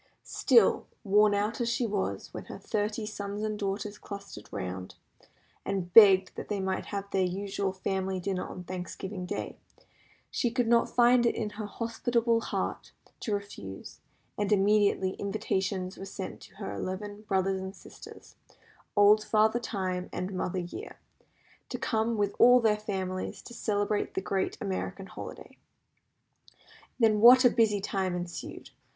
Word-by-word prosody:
Still, 460 - +3 0.2
worn 210 0 +4
out 210 +4 -1
as 235 - +1
she 240 +1 0
was, 205 -3 -3
when - - -7
her - - -8
thirty 215 0 -2
sons 205 -1 -5
and 215 -1 -2
daughters 205 +1 -3
clustered 200 - -9
round, 90 0 -5 0.7
and 185 -3 -3
begged 195 -4 +8
that - - -6
they 205 -2 -2
might 190 0 -2
have 200 -1 -5
their 195 - +1
usual 195 +1 -2
family 190 0 -2
dinner 185 0 -2
on 180 - -8
Thanksgiving 185 +1 -6
day, - - -4 0.7
she 240 - +1
could 245 0 0
not 235 0 +4
find 245 0 +5
it - - +1
in 210 -2 -3
her 210 0 -6
hospitable 230 +1 0
heart - - -3 0.3
to 215 -4 -1
refuse, 150 - -8 0.4
and 205 0 0
immediately 200 -1 +3
invitations 195 -2 -2
were 195 - -6
sent 190 -1 -7
to - - -15
her 195 0 -5
eleven 205 +2 -5
brothers 190 -2 0
and 190 +1 -6
sisters, - - -13 0.6
old 210 +1 +6
Father 220 +2 +3
Time, 185 -5 -3
and 185 +2 -4
Mother 185 0 -2
Year, 180 - -6 0.7
to - - -3
come 225 0 0
with 205 -1 0
all 245 +1 +8
their 215 -3 +2
families 190 -3 -4
and 235 - -10
celebrate 205 -1 -1
the 190 - 0
great 190 0 -1
American 195 0 -4
holiday. - - -10 1.4
Then 220 -3 +4
what 250 +4 +9
a 245 - +7
busy 215 -3 +3
time 190 -2 -1
ensued! 175 -1 -6
200 Hz, 150 wpm, -29 LUFS, 190-215 Hz, 1.4 s, what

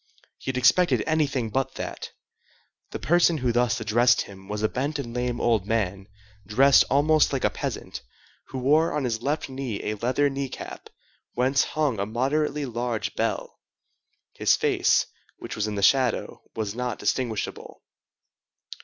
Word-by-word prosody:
He - - -6
had 130 - -2
expected 150 +8 +4
anything 140 -8 0
but 135 +3 -1
that. - - -6 0.8
The - - -5
person 175 0 +3
who 125 -4 0
thus 120 -1 +1
addressed 115 +3 +3
him 95 -1 -10
was 105 +1 -4
a - - +4
bent 140 +6 -2
and 120 -5 -5
lame 125 0 -2
old 110 -5 +1
man, 100 -3 -1 0.4
dressed 130 +8 +5
almost 150 +2 +3
like 135 -2 -2
a - - +2
peasant, - - -5 0.5
who 135 - -7
wore 150 +6 +3
on 150 - -1
his 115 -3 -2
left 145 +4 -1
knee 130 -6 -4
a 105 - -2
leather 125 +7 +1
knee 135 -1 -3
cap, - - -9 0.4
whence 130 +3 +2
hung 145 -9 +1
a 100 - -1
moderately 140 +5 0
large 120 -2 -3
bell. - - -3 0.7
His - - +3
face, - - +2 0.3
which - - -7
was 110 0 -1
in 105 - -3
the 100 - -2
shadow, 130 +2 +2
was 105 -3 -3
not 125 -1 -3
distinguishable. 110 0 -3
125 Hz, 160 wpm, -25 LUFS, 110-140 Hz, 0.8 s, dressed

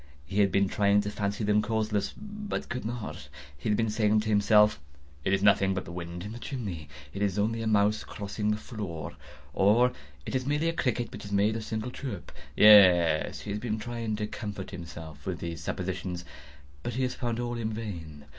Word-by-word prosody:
He 95 +6 -2
had 100 -2 +4
been 100 +1 +3
trying 100 +1 +3
to 105 0 -3
fancy 100 +1 -2
them 105 0 +3
causeless, 110 -2 -1
but 210 0 -5
could 125 -1 -4
not. 115 -1 -5 0.3
He 70 +9 -4
had 105 - +3
been 115 -1 +1
saying 105 0 +3
to 110 - -3
himself—"It 75 -9 +2
is 100 0 +2
nothing 95 -1 +4
but 95 - -3
the - - -8
wind 85 0 -6
in 105 - -6
the 120 - -7
chimney—it 80 - -6
is 100 -2 +1
only 115 +2 +1
a 110 - -2
mouse 105 0 +3
crossing 105 +1 -3
the 105 - +1
floor," 100 -8 -6 0.4
or 110 - +4 0.3
"It - - -5
is 130 0 -1
merely 150 +3 +1
a - - -1
cricket 125 -6 -1
which - - -8
has 100 - -8
made 100 +2 +3
a 115 - -2
single 110 +2 -4
chirp." 125 -9 -6 0.2
Yes, 90 -7 +7
he 105 - -5
had 105 +1 -3
been 110 -3 -1
trying 115 -1 -3
to 105 0 -2
comfort 105 -2 -6
himself 80 -3 -9
with 90 -2 -1
these 85 -2 -5
suppositions: 90 +1 -3 0.6
but 120 - -4
he 130 - 0
had 125 - 0
found 120 -2 -2
all 120 0 -2
in 110 -1 -2
vain. 85 -10 -6
105 Hz, 200 wpm, -29 LUFS, 90-110 Hz, 0.6 s, Yes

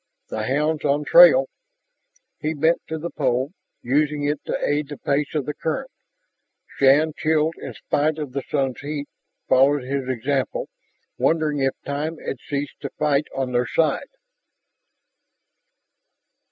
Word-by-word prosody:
"The 110 0 -3
hound's 150 +3 0
on 145 +1 +1
trail." - - +8 0.9
He 155 +1 -2
bent 160 +3 +2
to 160 - -3
the 170 +2 -5
pole, 130 0 0 0.3
using 145 +3 +1
it 145 0 -1
to - - -1
aid 145 0 0
the 145 - -7
pace 140 +3 -1
of 145 -4 0
the 150 - -3
current. 210 - -3 0.7
Shann, 145 +3 +3
chilled 160 0 +1
in 130 -4 -7
spite 150 +6 0
of 150 -4 -5
the 140 +1 -3
sun's 135 -2 -2
heat, 145 0 -5 0.4
followed 135 +1 +4
his 135 0 -3
example, 130 +2 -1 0.5
wondering 155 -3 +1
if 135 -1 +1
time 150 +3 -3
had 135 - -5
ceased 140 +1 -5
to - - -4
fight 150 -1 +1
on 130 -1 -2
their 125 0 +1
side. 160 - 0
145 Hz, 140 wpm, -23 LUFS, 135-155 Hz, 0.9 s, trail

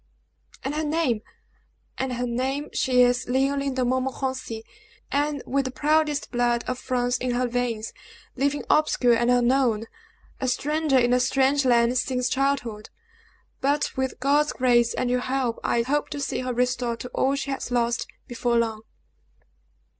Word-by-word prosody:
"And 270 - -2
her 310 +1 -1
name!" 295 -8 0 0.8
"And 265 -1 -1
her 245 +1 -2
name. 265 +5 -2
She 250 -1 +3
is 245 0 +1
Leoline 275 +1 +1
De 255 -1 +1
Montmorenci! 260 -2 -2 0.5
And 290 0 0
with 275 +1 0
the 260 - -3
proudest 300 +1 +1
blood 240 -1 +1
of 255 0 -3
France 245 0 0
in 250 -1 -1
her 250 +1 +1
veins, 235 -2 -2 0.4
living 280 +2 0
obscure 265 -5 +3
and 235 +1 +2
unknown 245 -2 +2 0.5
a 260 - -1
stranger 300 +2 +1
in 245 -1 +3
a 250 - +4
strange 270 +2 +2
land 240 0 +3
since 250 -1 -1
childhood; 260 -6 -1 0.7
but, 285 +2 0
with 265 0 -2
God's 290 +3 +2
grace 240 -2 +3
and 255 - -1
your 250 - +2
help, 255 -2 -1
I 235 - +1
hope 290 +4 -1
to 290 - -5
see 280 - -2
her 255 0 -2
restored 245 -1 -1
to 250 - -6
all 270 +2 +1
she 275 0 -3
has 270 - -4
lost, 240 -1 0 0.2
before 240 0 0
long." 225 -2 0
255 Hz, 160 wpm, -25 LUFS, 245-275 Hz, 0.8 s, a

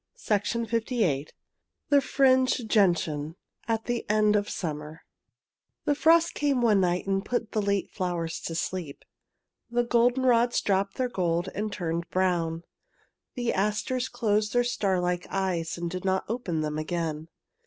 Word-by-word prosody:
I 205 - +5
THE 230 +3 -2
FRINGED 225 - -17
GENTIAN 220 - 0 0.6
THE 285 -1 +5
FRINGED 260 -4 +2
GENTIAN 165 -6 +2 0.3
AT 225 -1 -1
THE 240 -1 -1
EKD 210 0 +3
OF 205 0 0
SUMMER 155 -1 -5 0.8
The 295 - +3
frost 330 +3 +4
came 285 -3 +1
one 210 -4 +4
night 180 0 0
and 195 0 0
put 230 0 -2
the 215 - 0
late 200 -1 -1
flowers 170 -3 -3
to 165 - -4
sleep. 170 -4 -4 0.6
The 240 0 +1
goldenrods 240 0 +3
dropped 195 0 0
their 255 - 0
gold 175 -6 -1
and 210 +1 -3
turned 170 -3 -3
brown. 170 -3 0 0.7
The 240 -2 -1
asters 210 +6 -1
closed 210 -2 0
their 245 0 +3
starlike 180 -6 0
eyes 180 -4 -1
and 170 0 -3
did 180 +1 -5
not 190 0 +1
open 205 -9 -2
them 155 0 -2
again. 160 -1 -3
200 Hz, 150 wpm, -27 LUFS, 170-235 Hz, 0.8 s, I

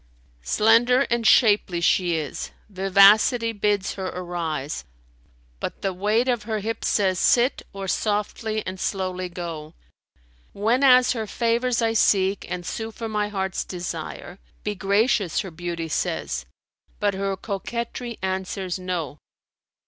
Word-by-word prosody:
Slender 230 - +4
and 235 -2 +2
shapely 205 -7 +4
she 175 0 +2
is; 155 -3 -4 0.2
vivacity 200 +5 +5
bids 205 -2 0
her 190 -1 -4
arise, 165 - -4 0.4
* - - -34
But - - -5
the 195 -1 0
weight 210 +6 +1
of 240 -3 +1
her 215 +1 -3
hips 220 +2 -3
says, 190 -3 +2
'Sit, 245 +2 +3
or 195 -1 -6
softly 215 +2 -1
and 185 0 -5
slowly 185 -2 -2
go.' 165 -3 -7 0.8
Whenas 250 +4 +4
her 225 -3 -3
favours 235 +2 0
I 225 0 +2
seek 195 -3 +2
and 180 -1 -4
sue 225 +4 -4
for 225 +1 -6
my 210 -1 -1
heart's 190 -2 -2
desire, 175 +1 -6
* - - -34
'Be 210 - -1
gracious,' 200 0 +1
her 190 - -7
beauty 170 0 -4
says; 60 - -2 0.5
but 205 -1 +1
her 195 0 -2
coquetry 235 +4 -5
answers, 190 -1 -3
'No.' 170 -6 -4
195 Hz, 135 wpm, -24 LUFS, 180-225 Hz, 0.8 s, vivacity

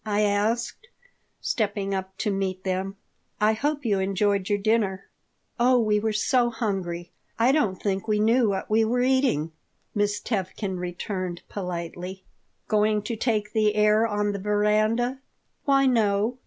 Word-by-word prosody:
I 210 -1 0
asked, 215 - 0 0.5
stepping 200 -3 -1
up 190 0 -4
to 210 +1 -1
meet 190 -1 -2
them. 190 +1 -2 0.4
"I 215 +1 +4
hope 290 +4 -2
you 205 -4 +2
enjoyed 195 +1 0
your 205 - +2
dinner." 205 -2 0 0.5
"Oh, 250 +1 +5
we 215 -2 +2
were 220 +1 0
so 240 +3 +2
hungry, 185 -7 -3 0.3
I 235 +3 +4
don't 220 -11 +1
think 195 +1 -2
we 210 -1 +1
knew 225 +1 +3
what 195 -1 -2
we 220 +1 +3
were 245 +3 +1
eating," 255 - +2 0.4
Miss 205 0 0
Tevkin 190 -2 -3
returned, 180 0 -4
politely 180 0 -5 0.4
"Going 210 -1 +2
to 230 +2 -3
take 215 -2 -1
the 215 -1 +2
air 210 +1 +4
on 205 -1 0
the 200 - -4
veranda?" 215 +5 +1 0.5
"Why 275 -2 +4
no. 225 -1 +2
210 Hz, 150 wpm, -25 LUFS, 195-225 Hz, 0.5 s, Oh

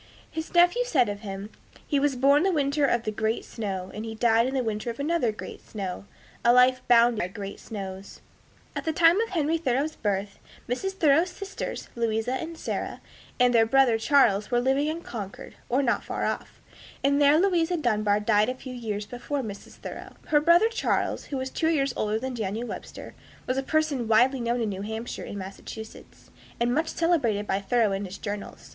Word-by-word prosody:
His 320 0 -5
nephew 355 +7 +5
said 265 - +2
of 205 0 -4
him, 200 0 -7 0.3
"He 285 - +1
was 285 -1 +1
born 280 +3 +4
the 380 +2 +2
winter 285 -2 +1
of 240 -3 +1
the 215 - -2
great 220 +1 -1
snow, 190 -4 -5
and 215 - -5
he 225 0 -6
died 230 +1 +3
in 265 - -3
the 260 - +1
winter 220 0 -3
of 235 - -6
another 295 -5 +1
great 215 - -9
snow, 195 -3 -6 0.4
a 235 - +6
life 250 +1 +5
bounded 235 -1 +5
by 175 - 0
great 195 +1 -7
snows." 195 -3 -7 0.6
At - - -3
the 320 - -1
time 335 +5 +5
of 460 - -2
Henry 325 -2 0
Thoreau's 285 +1 0
birth, 200 -1 -2 0.3
Mrs. 385 +11 -2
Thoreau's 325 -1 +3
sisters, 395 +2 -6
Louisa 230 +1 0
and 325 +5 -4
Sarah, - - -4 0.4
and 250 0 +4
their 225 -1 +5
brother 245 -2 +4
Charles 225 -6 +3
were 240 - +2
living 270 +4 +1
in 320 +2 -3
Concord, 205 -5 -7 0.2
or 260 +4 +2
not 240 - +1
far - - -3
off, - - -4 0.4
and 280 +1 +3
there 290 +1 +6
Louisa 350 -2 +2
Dunbar 215 -7 +1
died 210 +1 +3
a 255 - -2
few 255 0 -9
years 215 -4 -4
before 260 +4 -4
Mrs. 205 -3 -8
Thoreau. - - -8 0.2
Her 295 -2 +4
brother 340 +8 +5
Charles, 460 - -1
who 280 - -4
was 260 0 -4
two 320 - 0
years 275 -5 +1
older 215 0 0
than 260 +3 -4
Daniel 220 +1 -3
Webster, - - -8 0.3
was 255 - -1
a - - 0
person 290 -4 0
widely 245 +5 +4
known 235 +1 0
in 220 - 0
New 195 -1 -4
Hampshire 220 +3 -5
and 205 - -6
Massachusetts, 200 +3 -10 0.3
and 240 +1 +1
much 315 +4 +1
celebrated 280 -14 +1
by 195 -1 0
Thoreau 220 +1 +2
in 195 +1 -2
his 190 +1 -8
journals. 205 -1 -6
245 Hz, 200 wpm, -26 LUFS, 215-290 Hz, 0.6 s, a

